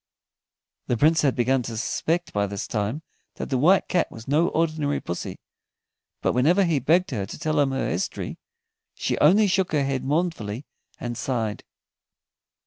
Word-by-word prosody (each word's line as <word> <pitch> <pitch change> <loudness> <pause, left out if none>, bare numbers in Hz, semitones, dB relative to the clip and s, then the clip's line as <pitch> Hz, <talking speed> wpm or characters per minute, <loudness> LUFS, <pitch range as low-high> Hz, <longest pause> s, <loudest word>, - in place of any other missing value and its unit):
The 120 - +1
Prince 160 +6 +4
had 140 -3 +2
begun 125 +2 +2
to 115 -2 -5
suspect 160 +11 -1
by 100 0 +1
this 100 0 -4
time 110 +8 -2 0.3
that - - -6
the 130 - +2
White 180 +8 +4
Cat 175 - +1
was 115 0 -11
no 155 +5 +3
ordinary 155 -4 0
pussy, 85 - -5 0.9
but - - +2
whenever 165 +11 +4
he 165 -5 +2
begged 165 +7 +2
her 100 -6 -2
to - - -8
tell 155 -2 0
him 140 -2 +3
her 135 - -1
history, - - -3 0.6
she - - -1
only 195 +9 +6
shook 190 -3 +1
her 145 -2 +2
head 135 -1 -1
mournfully 145 - -1 0.3
and 120 -1 -4
sighed. 115 -4 -2
140 Hz, 165 wpm, -25 LUFS, 120-165 Hz, 0.9 s, only